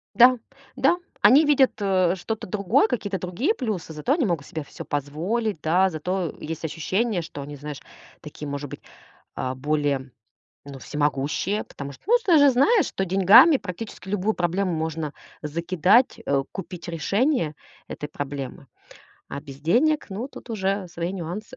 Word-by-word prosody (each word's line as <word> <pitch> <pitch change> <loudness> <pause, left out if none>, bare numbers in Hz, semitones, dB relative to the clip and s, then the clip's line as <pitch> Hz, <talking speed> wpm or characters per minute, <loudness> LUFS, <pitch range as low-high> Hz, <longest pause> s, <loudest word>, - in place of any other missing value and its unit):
Да, 250 +1 +7 0.4
да. 270 +6 +3 0.2
Они 285 +5 +7
видят, 280 -3 +4
э, 185 -3 +2
что-то 210 +4 -5
другое, 200 +1 +2
какие-то 205 -5 -2
другие 215 - -1
плюсы, 200 - -4
зато 155 - -1
они 300 -4 +2
могут 170 -7 -1
себе 160 -4 -5
всё - - -10
позволить, 165 - -2
да. 180 +5 +3
Зато 175 +2 -2
есть 165 +1 -6
ощущение, 185 +5 -1
что 145 -3 -8
они, 145 +1 -8
знаешь, 145 0 -7 0.4
такие, 150 -1 -8
может 140 0 -5
быть, - - -8 0.6
э, 130 0 -2
более, 145 -2 -1 0.5
ну, 140 -2 -9
всемогущие. 150 +8 -1
Потому 140 0 -8
что, - - -18
ну, 480 +3 +6
с 470 - -18
ты 345 -5 +5
же 285 -1 +7
знаешь, 370 - +4
что 195 - -2
деньгами 195 - +7
практически 200 -1 -8
любую 205 +2 0
проблему 180 +1 0
можно 160 -2 -3 0.3
закидать, 170 - +2
э, 140 -1 +1
купить 180 -2 -7
решение 170 - 0 0.3
этой 150 - -6
проблемы. 140 -2 -6 0.6
А 140 - -5
без 140 -1 -12
денег- 280 - +2
ну, 225 +8 -4
тут 250 - -12
уже 195 -3 -1
свои 170 +1 -4
нюансы. 195 +8 -6
180 Hz, 160 wpm, -24 LUFS, 150-220 Hz, 0.6 s, Да